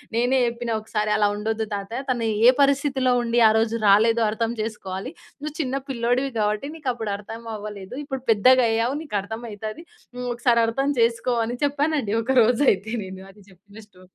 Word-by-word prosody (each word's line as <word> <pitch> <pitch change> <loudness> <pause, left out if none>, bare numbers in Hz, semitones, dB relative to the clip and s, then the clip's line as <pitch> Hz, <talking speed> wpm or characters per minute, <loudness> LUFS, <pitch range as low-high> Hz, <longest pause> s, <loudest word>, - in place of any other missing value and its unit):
నేనే 245 +3 +2
చెప్పిన 235 0 -3
ఒకసారి, 215 0 -2
"అలా 205 -1 +3
ఉండొద్దు 220 +1 -2
తాతయ, 205 +6 -4
తను 240 -3 0 0.2
ఏ - - +10
పరిస్థితిలో 275 -2 +2
ఉండి, 235 +1 +1
ఆ - - +6
రోజు 225 +1 +1
రాలేదో 225 +3 +5
అర్థం 225 +1 -1
చేసుకోవాలి. 210 +1 -5 0.3
నువ్వు 300 0 -6
చిన్న 270 -3 -1
పిల్లోడివి 250 +2 0
గాబట్టి 210 +5 0
నీకప్పుడు 245 -8 -3
అర్థం 225 +3 -9
అవ్వలేదు. 205 +1 -8
ఇప్పుడు 270 -3 -5
పెద్దగయ్యావు, 230 +2 +4
నీకర్థం 220 -4 -4
అయితాది. 215 +9 -7 0.3
నువ్వొకసారి 240 -1 +1
అర్థం 270 +5 0
చేసుకో." 235 +1 +1
అని 245 +2 -4
చెప్పానండి, 285 -6 0
ఒక 255 +4 -2
రోజయితే 225 -3 +2
నేను. 190 0 -9
అది 205 +1 -20
చెప్పిన 200 +3 -17
స్టో 185 -2 -21
230 Hz, 155 wpm, -23 LUFS, 210-255 Hz, 0.3 s, ఏ